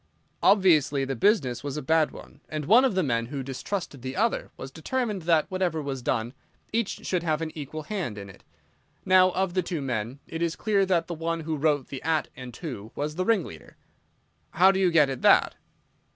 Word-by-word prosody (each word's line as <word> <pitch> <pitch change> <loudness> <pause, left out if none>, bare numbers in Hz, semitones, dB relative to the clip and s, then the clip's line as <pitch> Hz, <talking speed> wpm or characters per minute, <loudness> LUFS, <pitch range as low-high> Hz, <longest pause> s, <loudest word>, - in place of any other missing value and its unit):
"Obviously 160 -8 +4
the 135 0 -3
business 130 - +1
was 145 0 -4
a - - -3
bad 160 +2 +3
one, - - -13
and 155 -1 -4
one 230 - +6
of 255 -7 +1
the 185 - +2
men 115 -4 0
who 135 +1 -5
distrusted 140 +2 -5
the 130 +1 -5
other 225 +4 0
was 130 - -8
determined 210 - -2
that, 165 -2 +3
whatever 185 -4 0
was 140 -3 -4
done, 120 0 -1 0.4
each 230 -2 -2
should 180 -2 0
have 155 -2 0
an 165 -1 -4
equal 155 +1 -6
hand 175 - -4
in 100 -1 -7
it. 95 - -15 0.6
Now, 185 0 +6
of 185 0 -1
the 185 - +2
two 170 -2 -4
men, 125 -2 -3
it 165 - -6
is 170 -1 0
clear 200 -3 +1
that 170 -3 +2
the 170 - -5
one 165 0 -3
who 160 0 -3
wrote 145 -2 0
the 135 - -6
'at' 160 -1 0
and 125 -1 -8
'to' 120 - -7
was 150 +1 -3
the 185 +3 -2
ringleader." 185 - -2 0.8
"How 185 +3 +6
do 190 - -1
you 185 -2 +4
get 160 -4 +5
at 135 -2 -5
that?" - - +5
160 Hz, 210 wpm, -26 LUFS, 135-185 Hz, 0.8 s, one